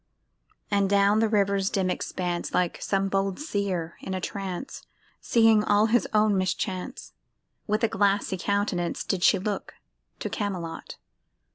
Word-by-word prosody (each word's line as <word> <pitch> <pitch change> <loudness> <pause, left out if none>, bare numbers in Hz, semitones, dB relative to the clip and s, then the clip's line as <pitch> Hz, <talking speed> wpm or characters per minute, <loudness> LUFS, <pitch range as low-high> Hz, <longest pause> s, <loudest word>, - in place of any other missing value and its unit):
And 200 -1 +2
down 200 +1 +4
the 225 0 +2
river's 200 -2 +2
dim 185 -2 0
expanse 175 -1 -3
Like 180 -2 0
some 195 0 0
bold 195 +1 -1
seer 200 - -2
in 190 - -4
a - - -2
trance, 195 +4 -5 0.4
Seeing 225 -2 +4
all 210 0 +3
his 235 +2 +2
own 215 -1 +3
mischance— 185 +4 -3 0.5
With 215 +2 0
a - - +5
glassy 200 -1 +1
countenance 200 -3 -1
Did 190 -3 -2
she 200 - +6
look 200 +2 -4 0.4
to - - -4
Camelot. 185 -6 -4
200 Hz, 140 wpm, -26 LUFS, 185-210 Hz, 0.5 s, she